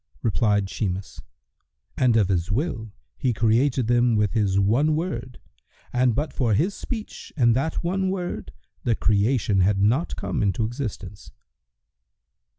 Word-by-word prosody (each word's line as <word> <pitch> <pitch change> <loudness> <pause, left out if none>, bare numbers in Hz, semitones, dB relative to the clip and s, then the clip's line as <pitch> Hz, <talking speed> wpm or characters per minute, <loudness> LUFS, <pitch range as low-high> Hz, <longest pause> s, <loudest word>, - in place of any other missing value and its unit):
Replied 105 -3 +1
Shimas, 95 -2 -4 0.7
"And 120 -3 +3
of 100 -4 +2
His 90 -1 0
will, 110 - -2 0.3
He 130 -3 +1
created 120 +4 +2
them 120 0 +3
with 105 -2 +1
His 100 -4 +2
one 125 +10 +2
Word 130 -7 -4 0.6
and 125 -2 +2
but 150 +3 -2
for 115 -6 +1
His 180 - +1
speech 220 -1 -7
and 120 -4 +4
that 155 +7 -1
one 190 +2 0
Word, 185 -2 -4 0.3
the 115 - +1
creation 105 0 +2
had 95 +2 +3
not 120 - +1
come 95 -2 -3
into 105 +2 +1
existence." 110 -5 -6
115 Hz, 140 wpm, -24 LUFS, 105-135 Hz, 0.7 s, and